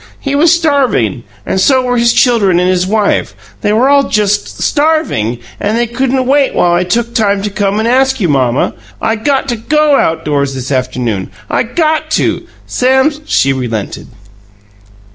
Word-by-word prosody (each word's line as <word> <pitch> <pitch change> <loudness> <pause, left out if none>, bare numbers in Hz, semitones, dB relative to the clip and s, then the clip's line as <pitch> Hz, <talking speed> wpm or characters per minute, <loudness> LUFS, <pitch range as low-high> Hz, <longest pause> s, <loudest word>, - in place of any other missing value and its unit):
He 275 - -3
was 310 +4 +4
starving 275 - +1 0.2
and 190 - -1
so 260 +4 +3
were 245 0 -1
his 235 0 +3
children 210 -10 +2
and 180 - +1
his 185 0 +1
wife. 210 0 0 0.3
They 205 - 0
were 230 +5 +2
all 280 0 +3
just 205 -1 -1
STARVING 295 - 0 0.2
and 215 +3 -1
they 240 - +1
couldn't 260 +2 -1
wait 275 +1 +2
while 175 - +2
I 175 +1 +2
took 235 +5 -1
time 200 -3 +1
to 205 - -3
come 200 0 -1
and 220 +1 0
ask 265 +2 +2
you, 185 - +1
Mamma. 130 -4 +1 0.3
I 225 0 0
got 270 +4 -1
to 240 - -1
GO 300 +4 +2
outdoors 145 -4 -1
this 130 +1 -5
afternoon. 125 -6 -2 0.2
I - - +1
GOT 310 +5 -1
to! - - -1 0.2
Sam's 265 +4 +1
" - - -28
She 135 0 +2
relented. 115 -6 -4
225 Hz, 175 wpm, -12 LUFS, 175-270 Hz, 0.3 s, was